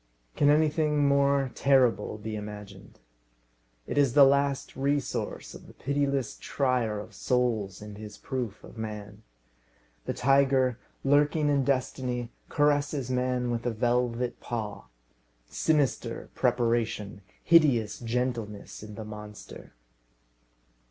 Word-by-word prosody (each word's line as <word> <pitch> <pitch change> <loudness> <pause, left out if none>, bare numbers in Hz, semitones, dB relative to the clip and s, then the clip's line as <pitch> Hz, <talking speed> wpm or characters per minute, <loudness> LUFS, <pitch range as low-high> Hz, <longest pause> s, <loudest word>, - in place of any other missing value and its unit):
Can 145 - +4
anything 150 -1 +3
more 140 -1 +3
terrible 125 -7 +2
be 110 +1 -5
imagined? 105 -1 -9 0.9
It 145 - -1
is 135 -4 +3
the 145 - +9
last 140 0 +2
resource 140 0 -2
of - - -12
the - - -15
pitiless 140 -2 -1
trier 125 -6 0
of 105 - -9
souls 110 -6 -1
in 105 -1 -9
his 105 -1 -9
proof 125 -6 -4
of 115 - -12
man. 105 -2 -6 0.8
The - - -2
tiger, 135 -1 +3 0.2
lurking 145 +2 +3
in 140 -2 +2
destiny, 125 -2 -1 0.2
caresses 145 -3 +1
man 125 -1 0
with 115 -1 -2
a - - +1
velvet 120 +1 0
paw. 110 - -5 0.6
Sinister 145 - 0
preparation, 115 -4 0 0.2
hideous 125 -11 +4
gentleness 115 -3 -3
in 105 -1 -9
the 110 - -7
monster! 105 - -10
125 Hz, 115 wpm, -28 LUFS, 110-140 Hz, 0.9 s, the